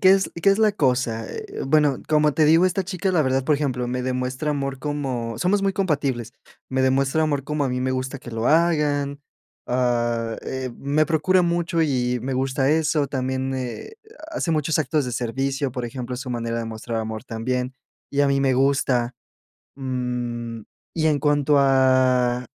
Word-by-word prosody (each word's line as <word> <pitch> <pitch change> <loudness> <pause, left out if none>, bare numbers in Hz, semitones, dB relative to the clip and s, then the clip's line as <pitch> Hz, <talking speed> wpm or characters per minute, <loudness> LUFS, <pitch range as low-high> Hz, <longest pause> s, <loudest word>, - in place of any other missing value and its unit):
¿qué 185 - +6
es 195 0 +2
qué 200 - +6
es 195 - +2
la 215 -1 +4
cosa? 125 - 0
Eh, - - -6
bueno, 145 -1 +3
como 150 -1 +3
te 155 - +4
digo, 165 +4 +5
esta 185 +1 0
chica, 190 0 -2
la 170 -4 +3
verdad, 130 -1 +1
por 150 - +3
ejemplo, 130 -4 -1
me 125 +1 -2
demuestra 130 +3 -2
amor 135 -2 -2
como 130 -6 -3
somos 195 +8 +2
muy 195 0 +1
compatibles. 140 - -1 0.4
Me 130 0 +1
demuestra 135 +3 +2
amor 145 -3 0
como 150 0 -2
a - - 0
mí 125 0 -2
me 130 0 0
gusta 130 +1 -3
que 120 - -10
lo 115 +1 -1
hagan. 150 -4 +2 0.5
Ah, 120 -2 0
eh, 130 -1 -4
me 145 +2 +1
procura 170 +3 +3
mucho 170 -1 +1
y 125 -4 0
me 130 +1 -2
gusta 135 +1 +1
eso, 155 -2 +2
también, 130 0 -2
eh, 130 - -5 0.4
hace 240 - -1
muchos 155 0 +1
actos 150 0 +1
de 125 - -4
servicio. 135 +3 -1
Por 125 -1 -4
ejemplo, 125 0 -5
su 130 +1 -6
manera 115 -1 -2
de 115 - -3
mostrar 115 +1 -4
amor 110 +1 -5
también, 125 +2 -3 0.4
y 145 - 0
a 140 - +3
mí 140 0 +2
me 135 -1 +3
gusta, 130 -2 +1 0.6
mm, 125 -3 -4 0.3
y 160 -1 +2
en 150 -2 +2
cuanto 145 0 +2
a, 130 -2 +3
135 Hz, 185 wpm, -23 LUFS, 125-150 Hz, 0.6 s, qué